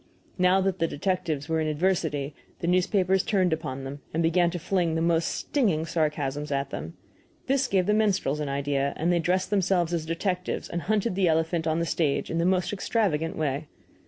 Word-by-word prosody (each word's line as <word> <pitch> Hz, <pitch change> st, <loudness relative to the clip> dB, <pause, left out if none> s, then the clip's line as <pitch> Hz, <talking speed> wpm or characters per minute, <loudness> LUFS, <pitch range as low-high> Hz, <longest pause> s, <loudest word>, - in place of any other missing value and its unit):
Now 185 Hz, +1 st, +4 dB
that 190 Hz, -1 st, 0 dB
the 165 Hz, -, +2 dB
detectives 165 Hz, -3 st, -2 dB
were 160 Hz, -1 st, 0 dB
in 155 Hz, -, 0 dB
adversity, 155 Hz, -3 st, 0 dB, 0.2 s
the -, -, -5 dB
newspapers 185 Hz, +1 st, +2 dB
turned 185 Hz, -3 st, +1 dB
upon 135 Hz, -4 st, -4 dB
them, 140 Hz, +2 st, -7 dB
and 165 Hz, -, +1 dB
began 170 Hz, +1 st, +3 dB
to 175 Hz, -, -4 dB
fling 175 Hz, -1 st, 0 dB
the 160 Hz, -, 0 dB
most 165 Hz, -1 st, +2 dB
stinging 195 Hz, -, 0 dB
sarcasms 150 Hz, -3 st, -1 dB
at 140 Hz, 0 st, -1 dB
them. 80 Hz, +3 st, -6 dB, 0.5 s
This 270 Hz, 0 st, +1 dB
gave 190 Hz, -4 st, +2 dB
the 210 Hz, -, +2 dB
minstrels 200 Hz, -9 st, +1 dB
an 150 Hz, -2 st, -2 dB
idea, 140 Hz, 0 st, 0 dB
and 170 Hz, +3 st, +1 dB
they 170 Hz, -, +2 dB
dressed 185 Hz, +4 st, 0 dB
themselves 185 Hz, -4 st, +2 dB
as 160 Hz, -2 st, -2 dB
detectives 180 Hz, +2 st, -2 dB
and 170 Hz, -, -3 dB
hunted 215 Hz, +2 st, 0 dB
the 185 Hz, -1 st, +2 dB
elephant 160 Hz, 0 st, +1 dB
on 160 Hz, 0 st, +1 dB
the 170 Hz, -, 0 dB
stage 160 Hz, -3 st, 0 dB
in 165 Hz, -, 0 dB
the 170 Hz, -, +2 dB
most 185 Hz, +1 st, +1 dB
extravagant 190 Hz, -6 st, 0 dB
way. 145 Hz, 0 st, -1 dB
170 Hz, 195 wpm, -26 LUFS, 150-185 Hz, 0.5 s, Now